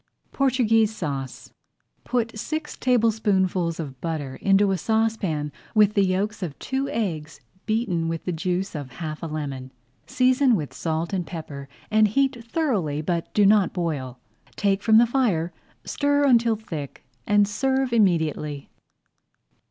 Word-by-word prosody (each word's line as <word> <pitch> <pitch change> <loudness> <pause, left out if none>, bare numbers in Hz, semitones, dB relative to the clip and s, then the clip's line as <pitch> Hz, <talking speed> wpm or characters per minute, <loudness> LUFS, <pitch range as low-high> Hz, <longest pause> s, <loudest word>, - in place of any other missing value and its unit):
PORTUGUESE 225 -5 +2
SAUCE 140 - -5 0.5
Put 235 -2 -1
six 310 +7 -4
tablespoonfuls 205 -8 +1
of 135 -5 -7
butter 150 -5 -4
into 195 0 +3
a 190 - +1
saucepan 215 -10 0 0.2
with 210 -1 +5
the 200 - +3
yolks 195 +3 -1
of 165 -6 -5
two 270 +1 -2
eggs 165 -9 -3 0.3
beaten 215 -7 0
with 165 -1 -4
the 180 - -1
juice 180 +3 -2
of 145 -5 -6
half 155 0 -6
a 165 - -4
lemon. 140 -4 -5 0.4
Season 255 -1 +3
with 150 -7 -4
salt 165 +2 -2
and 180 -3 -2
pepper 145 -5 -7 0.2
and 215 0 +5
heat 265 +2 0
thoroughly 215 - -1
but 170 +1 -2
do 210 - +5
not 205 -1 +4
boil. 145 -8 -3 0.4
Take 200 -1 +1
from 220 +1 +5
the 235 - +7
fire, 210 -10 0 0.3
stir 285 0 +1
until 235 -4 +4
thick, 160 -10 -7 0.2
and 205 -1 +4
serve 265 +4 0
immediately. 160 -8 +1
195 Hz, 140 wpm, -24 LUFS, 160-225 Hz, 0.5 s, the